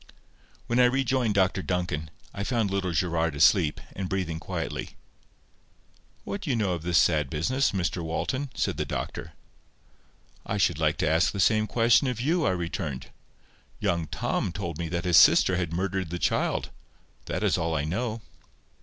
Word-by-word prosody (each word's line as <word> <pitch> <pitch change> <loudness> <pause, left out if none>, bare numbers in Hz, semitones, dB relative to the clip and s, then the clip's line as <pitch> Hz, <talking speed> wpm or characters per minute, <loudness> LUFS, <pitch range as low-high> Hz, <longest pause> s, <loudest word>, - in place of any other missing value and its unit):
When 120 +1 0
I 125 - +7
rejoined 130 -3 +1
Dr 95 0 +2
Duncan, 90 -4 -2 0.2
I 100 - -4
found 110 -3 0
little 95 -2 -1
Gerard 85 -1 0
asleep, 80 +1 +4 0.2
and 95 -1 -4
breathing 90 -4 -2
quietly. - - -5 1.3
"What 200 - -5
do 160 - -5
you 130 - +2
know 105 -5 0
of 85 - -4
this 85 0 +1
sad 75 -3 +3
business, 130 - 0
Mr 90 -3 -1
Walton?" 130 - -2
said - - -1
the - - 0
doctor. - - -5 1.1
"I - - -3
should - - +1
like - - +1
to - - 0
ask 80 +3 +3
the 100 - -6
same 110 +2 +3
question 120 +4 +3
of 125 -3 -2
you," 160 - +1
I - - +3
returned. 85 -6 -4 0.7
"Young 85 -2 0
Tom 90 - -2
told 85 -4 -5
me 85 -1 -3
that 85 +1 -3
his 90 -3 +4
sister 95 - +6
had 85 -3 -2
murdered 95 0 -2
the 90 - -3
child. - - 0 0.5
That - - -3
is - - +3
all 80 0 -1
I 75 - 0
know." 110 +8 -3
90 Hz, 170 wpm, -27 LUFS, 85-110 Hz, 1.3 s, I